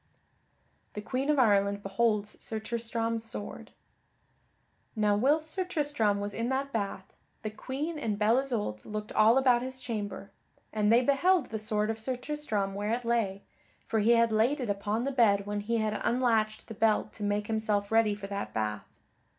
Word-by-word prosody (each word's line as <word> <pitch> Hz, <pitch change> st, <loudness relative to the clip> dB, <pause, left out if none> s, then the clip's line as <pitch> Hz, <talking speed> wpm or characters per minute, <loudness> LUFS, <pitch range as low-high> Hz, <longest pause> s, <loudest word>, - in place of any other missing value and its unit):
[Sidenote: -, -, -40 dB
The 210 Hz, -, -5 dB
Queen 270 Hz, +2 st, -1 dB
of 300 Hz, -, +3 dB
Ireland 200 Hz, -4 st, +3 dB
beholds 210 Hz, +1 st, 0 dB
Sir 220 Hz, -, -2 dB
Tristram's 230 Hz, 0 st, -2 dB
sword] 225 Hz, -2 st, -7 dB, 1.3 s
Now 210 Hz, -1 st, +2 dB
whilst 300 Hz, +8 st, +2 dB
Sir 375 Hz, -, -1 dB
Tristram 290 Hz, -, 0 dB
was 205 Hz, 0 st, -4 dB
in 230 Hz, +3 st, -2 dB
that 275 Hz, +1 st, -2 dB
bath, 200 Hz, -3 st, -3 dB, 0.3 s
the 215 Hz, -, -3 dB
Queen 290 Hz, +8 st, -4 dB
and 215 Hz, -7 st, -2 dB
Belle 220 Hz, +4 st, +3 dB
Isoult 220 Hz, -, -2 dB
looked 215 Hz, 0 st, -5 dB
all 220 Hz, +3 st, +5 dB
about 250 Hz, -3 st, +4 dB
his 260 Hz, +1 st, -6 dB
chamber. 205 Hz, -5 st, -5 dB, 0.4 s
And 210 Hz, -1 st, +2 dB
they 240 Hz, +2 st, +5 dB
beheld 335 Hz, +7 st, +2 dB
the 220 Hz, -, -2 dB
sword 215 Hz, 0 st, 0 dB
of 225 Hz, -, -6 dB
Sir 250 Hz, +3 st, -2 dB
Tristram 250 Hz, -8 st, -2 dB
where 205 Hz, +3 st, -2 dB
it 245 Hz, 0 st, -7 dB
lay, 215 Hz, -5 st, 0 dB, 0.4 s
for 225 Hz, -, 0 dB
he 225 Hz, +3 st, +4 dB
had 230 Hz, -1 st, +4 dB
laid 230 Hz, +7 st, +2 dB
it 240 Hz, -5 st, -1 dB
upon 205 Hz, +3 st, -2 dB
the 275 Hz, -, -1 dB
bed 205 Hz, -6 st, +3 dB
when 205 Hz, 0 st, -2 dB
he 230 Hz, +3 st, -1 dB
had 215 Hz, -1 st, -1 dB
unlatched 225 Hz, -3 st, +1 dB
the -, -, -7 dB
belt 215 Hz, 0 st, +1 dB
to 215 Hz, -, -6 dB
make 205 Hz, 0 st, 0 dB
himself 215 Hz, -2 st, -1 dB
ready 225 Hz, -2 st, +3 dB
for 205 Hz, -1 st, -8 dB
that 200 Hz, 0 st, -5 dB
bath. 105 Hz, -1 st, -2 dB
220 Hz, 185 wpm, -29 LUFS, 205-250 Hz, 1.3 s, all